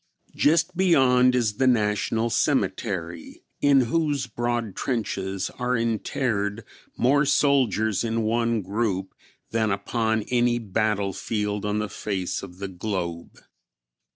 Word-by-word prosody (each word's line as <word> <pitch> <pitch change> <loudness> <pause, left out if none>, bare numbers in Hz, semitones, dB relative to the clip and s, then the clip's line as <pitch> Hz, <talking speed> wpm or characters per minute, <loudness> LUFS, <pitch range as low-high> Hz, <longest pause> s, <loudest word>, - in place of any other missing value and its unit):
Just 165 +4 +2
beyond 130 -8 +4
is 110 -4 0
the 130 - +2
National 110 0 +1
Cemetery, 85 -5 -1 0.2
in 140 -2 +5
whose 145 +1 0
broad 120 -3 -2
trenches 95 -6 -2
are 125 0 0
interred 115 -2 -1 0.3
more 140 +4 +3
soldiers 125 -8 +2
in 115 0 -1
one 115 0 0
group 95 -1 -2 0.4
than 110 -1 +1
upon 110 +2 0
any 120 -1 +2
battlefield 105 -1 -1
on 105 0 0
the 105 0 -1
face 95 -2 -3
of 90 -2 -10
the 100 +1 -4
globe. 90 -3 -5
110 Hz, 115 wpm, -25 LUFS, 100-125 Hz, 0.4 s, in